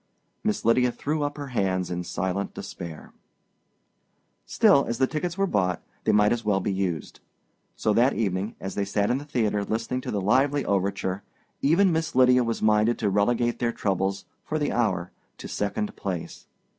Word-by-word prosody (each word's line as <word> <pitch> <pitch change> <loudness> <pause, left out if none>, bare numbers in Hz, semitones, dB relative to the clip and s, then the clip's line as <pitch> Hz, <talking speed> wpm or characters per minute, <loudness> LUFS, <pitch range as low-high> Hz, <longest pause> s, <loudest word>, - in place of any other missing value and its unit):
Miss 215 -1 -1
Lydia 125 +2 +4
threw 150 +6 -2
up 145 0 -2
her 145 -2 -6
hands 95 -6 0
in 90 0 -2
silent 95 +3 -3
despair. 80 -3 -8 1.3
Still, 140 0 +5
as 115 - -2
the 130 - +3
tickets 165 +5 -3
were 195 - +2
bought, 90 - 0 0.3
they - - +4
might 105 0 +4
as 120 -1 -3
well 105 -2 +2
be 100 +1 -1
used. 90 -5 -3 0.6
So 105 - +1
that 125 +5 +4
evening, 100 -1 -1
as 95 - -5
they 100 - -1
sat 100 +1 0
in 130 - +1
the 145 - -9
theater 110 -8 0
listening 115 +4 -2
to - - -6
the 105 - -1
lively 135 +8 +2
overture, 95 -1 -1 0.4
even 175 +6 +4
Miss 160 -3 -1
Lydia 125 -1 +5
was 115 -1 -2
minded 110 +2 +3
to 105 -3 0
relegate 120 +4 +1
their 120 -1 +1
troubles, 95 -2 -1 0.2
for 155 - -2
the 145 -2 0
hour, 95 -7 0 0.3
to - - -8
second 210 - -2
place. 90 -4 -5
110 Hz, 180 wpm, -26 LUFS, 95-130 Hz, 1.3 s, Still